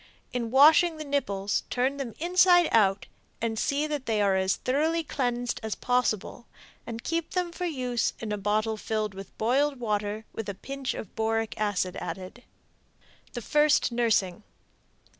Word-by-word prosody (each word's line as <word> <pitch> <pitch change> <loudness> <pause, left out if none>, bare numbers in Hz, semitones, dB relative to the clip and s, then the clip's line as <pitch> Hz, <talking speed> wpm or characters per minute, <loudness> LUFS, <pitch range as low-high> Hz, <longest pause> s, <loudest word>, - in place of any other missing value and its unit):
In 240 -2 -2
washing 310 +6 +6
the 310 - -5
nipples 205 -9 -1
turn 260 +3 0
them 255 -6 -5
inside 355 0 +4
out 195 -3 +3 0.3
and 225 -1 -2
see 290 +1 0
that 295 -3 -4
they 220 -2 +1
are 200 -2 +3
as 190 0 +1
thoroughly 315 +5 0
cleaned 245 -4 -2
as 220 -2 -3
possible, 245 -2 -1 0.4
and 230 -1 -6
keep 330 0 -2
them 360 -2 -1
for 360 +1 -3
use 250 -7 -1
in 220 -2 -5
a 210 - -1
bottle 215 +2 0
filled 215 -1 -2
with 195 0 -11
boiled 270 +5 +1
water 210 -1 -2
with 225 -2 -5
a 200 - -4
pinch 270 +4 -5
of 205 - -8
boric 225 0 0
acid 190 -3 0
added. 190 +6 -7 0.9
The 240 - -5
First 295 -1 +3
Nursing. 220 -6 +1
235 Hz, 160 wpm, -27 LUFS, 215-285 Hz, 0.9 s, washing